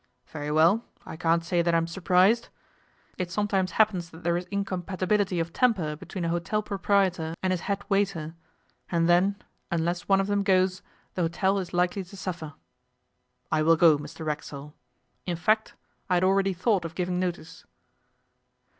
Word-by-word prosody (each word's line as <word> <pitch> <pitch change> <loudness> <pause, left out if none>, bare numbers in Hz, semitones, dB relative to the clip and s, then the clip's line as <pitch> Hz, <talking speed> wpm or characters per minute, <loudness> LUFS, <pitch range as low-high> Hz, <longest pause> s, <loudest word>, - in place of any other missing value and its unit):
Very 150 -1 -6
well, 165 +9 +4 0.2
I - - -7
can't 165 0 +1
say 175 0 +1
that 170 0 +1
I'm 165 0 +2
surprised. 185 +6 +2 0.7
It 180 -1 -2
sometimes 195 -1 0
happens 190 -6 +2
that 160 +2 -14
there 170 0 +1
is 175 +1 -3
incompatibility 195 0 -1
of 165 0 -3
temper 190 -12 +1
between 175 +3 -6
a - - 0
hotel 175 +5 -1
proprietor 190 -5 0
and 185 0 +2
his 180 - -1
head 200 0 -1
waiter, 195 -6 0 0.6
and 170 -1 +1
then, 180 +3 +4 0.3
unless 175 +1 -1
one 195 -1 +4
of 195 - +1
them 205 0 0
goes, 185 -1 +2 0.3
the 185 - -2
hotel 190 +4 +1
is 180 -3 -5
likely 180 +2 0
to 190 +2 -13
suffer. 170 -6 -5 1.0
I 155 - +2
will 165 +2 +5
go, 160 -1 +6
Mr 160 +2 -8
Racksole. 150 -1 -5 0.5
In 175 - -1
fact, 215 +5 +1 0.3
I 180 - +3
had 175 - +2
already 195 +1 +3
thought 185 +1 +1
of 165 -1 -7
giving 180 0 -1
notice. 175 -3 -4
180 Hz, 165 wpm, -27 LUFS, 165-195 Hz, 1.0 s, go